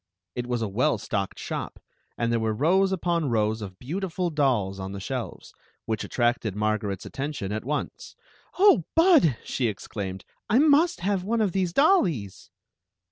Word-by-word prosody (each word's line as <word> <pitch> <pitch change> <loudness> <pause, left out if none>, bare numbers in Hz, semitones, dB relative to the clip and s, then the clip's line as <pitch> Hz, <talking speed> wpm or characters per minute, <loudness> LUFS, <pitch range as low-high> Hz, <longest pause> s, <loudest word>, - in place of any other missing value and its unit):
It 125 0 -4
was 120 -2 -1
a - - -1
well 120 +7 +1
stocked 100 -1 -3
shop, - - -5 0.4
and 115 0 0
there 115 - +2
were 110 -1 -1
rows 185 - +3
upon 170 -5 0
rows 110 -1 0
of 95 -3 -8
beautiful 175 - -3
dolls 120 -11 +1
on 95 +1 -5
the 100 - -5
shelves, 95 - -6 0.3
which 110 -1 -2
attracted 120 -4 0
Mar 110 0 +1
garet's 100 -3 -5
attention 135 -7 -4
at 110 +1 -3
once. 150 +2 -4 0.2
" - - -27
Oh, 375 - +5
Bud," 325 - +5
she 125 - -1
exclaimed, 95 -2 -5
" - - -59
I 220 - +4
must 300 - +4
have 195 0 0
one 225 +4 0
of 210 -4 +2
these 185 -1 0
dollies! 175 - +2
130 Hz, 175 wpm, -26 LUFS, -, 0.4 s, Oh